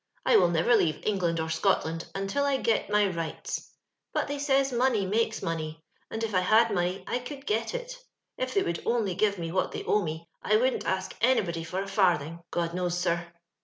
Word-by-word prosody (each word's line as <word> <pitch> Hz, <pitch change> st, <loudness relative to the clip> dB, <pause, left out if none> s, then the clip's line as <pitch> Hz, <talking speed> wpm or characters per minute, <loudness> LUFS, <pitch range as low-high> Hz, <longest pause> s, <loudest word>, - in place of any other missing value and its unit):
'*I -, -, +6 dB
will 180 Hz, -, +5 dB
never 170 Hz, +8 st, +3 dB
leave 155 Hz, -8 st, +1 dB
England 175 Hz, -5 st, +1 dB
or 160 Hz, -, -1 dB
Scotland 165 Hz, -1 st, 0 dB
until 195 Hz, +8 st, -1 dB
I 280 Hz, -1 st, +2 dB
get 230 Hz, -5 st, 0 dB
my 210 Hz, 0 st, +4 dB
rights; 170 Hz, -, -4 dB, 0.4 s
but -, -, +1 dB
they 285 Hz, 0 st, -3 dB
says 275 Hz, -2 st, +2 dB
money 240 Hz, -4 st, +2 dB
makes 220 Hz, +3 st, 0 dB
money, 160 Hz, -1 st, -3 dB, 0.3 s
and 225 Hz, -, -4 dB
if 220 Hz, -2 st, -2 dB
I 185 Hz, -, +4 dB
had 215 Hz, +4 st, +4 dB
money 180 Hz, +1 st, -1 dB
I 245 Hz, -, -1 dB
could 275 Hz, +2 st, -8 dB
get 225 Hz, -, -1 dB
it. -, -, -6 dB, 0.4 s
If -, -, -3 dB
they 395 Hz, -, +4 dB
would 170 Hz, -, -2 dB
only 230 Hz, -5 st, +1 dB
give 205 Hz, +2 st, +1 dB
me 165 Hz, -1 st, -4 dB
what 185 Hz, +1 st, 0 dB
they -, -, -4 dB
owe 210 Hz, -, +2 dB
me, 160 Hz, -1 st, -5 dB
I 215 Hz, -, +2 dB
wouldn't 255 Hz, +4 st, +1 dB
ask 190 Hz, 0 st, -1 dB
anybody 190 Hz, -9 st, +2 dB
for 180 Hz, +4 st, -3 dB
a -, -, -8 dB
farthing, 175 Hz, -5 st, +1 dB
God 170 Hz, -1 st, -1 dB
knows, 180 Hz, -1 st, -1 dB
sir. 170 Hz, -1 st, 0 dB
195 Hz, 205 wpm, -28 LUFS, 170-235 Hz, 0.4 s, I